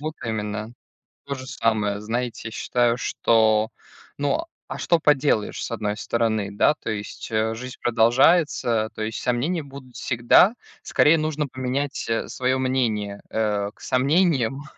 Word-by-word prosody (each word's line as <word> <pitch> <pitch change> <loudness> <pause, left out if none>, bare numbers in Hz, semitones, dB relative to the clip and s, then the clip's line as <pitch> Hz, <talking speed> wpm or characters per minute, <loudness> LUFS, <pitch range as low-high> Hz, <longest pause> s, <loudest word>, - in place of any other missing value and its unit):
Вот 155 +1 -4
именно, 110 0 -3 0.5
то 140 0 -3
же 130 0 -9
самое. 105 -4 0
Знаете, 115 +1 -3
я - - -13
считаю, 120 +1 +1
что, 110 -3 +2 0.5
ну, 145 - 0 0.2
а - - -6
что 170 -1 +2
поделаешь, 145 -8 +1
с - - -5
одной 105 -2 -2
стороны? 110 -2 0
Да, 105 +8 +3
то - - -7
есть, 105 +2 -6
э, 110 0 0
жизнь 125 +2 -8
продолжается, 120 0 +3
то - - -6
есть 110 +2 -3
сомнения 140 +8 0
будут 135 -3 -12
всегда. 120 - +4 0.3
Скорее 165 +2 +4
нужно 155 -1 -1
поменять, 130 +2 -3
э, 115 - -1
своё 130 +1 -1
мнение, 110 -6 -1
э, 105 -2 -1
к - - -24
сомнениям, 135 -1 +1
120 Hz, 145 wpm, -23 LUFS, 110-140 Hz, 0.5 s, всегда